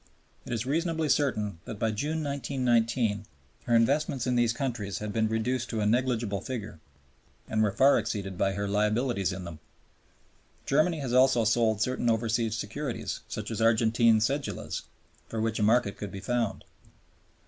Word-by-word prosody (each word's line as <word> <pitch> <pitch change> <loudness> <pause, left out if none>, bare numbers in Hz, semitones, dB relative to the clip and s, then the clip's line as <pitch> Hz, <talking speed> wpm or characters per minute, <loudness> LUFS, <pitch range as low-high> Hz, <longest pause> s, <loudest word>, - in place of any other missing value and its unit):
It - - -6
is 115 0 -1
reasonably 160 +2 0
certain 105 - 0
that 110 - -6
by 110 +1 0
June, 150 +9 -2
1919, 120 -6 0 0.4
her 120 - +2
investments 130 +2 +2
in 125 - +1
these 120 -1 +3
countries 115 -7 -3
had 105 -1 -5
been 110 -1 +2
reduced 120 +2 -1
to 110 - -2
a 105 - +1
negligible 115 -3 0
figure 105 -9 -6 0.7
and 110 - 0
were 105 -2 +3
far 135 +7 +5
exceeded 105 -4 -4
by 95 +2 +1
her 100 +1 -2
liabilities 105 0 +1
in 90 0 -5
them. 85 -3 -8 1.1
Germany 155 +3 +2
has 130 -3 -3
also 130 -2 +5
sold 110 -1 +2
certain 125 -1 0
overseas 115 0 +1
securities, 120 +4 -4
such 105 +1 -5
as 115 - -3
Argentine 115 0 +4
cedulas, 135 +5 -2 0.5
for 115 - -4
which 110 0 -1
a - - 0
market 110 -1 +2
could 105 - -6
be 100 - -6
found. 120 0 -1
115 Hz, 160 wpm, -28 LUFS, 105-130 Hz, 1.1 s, far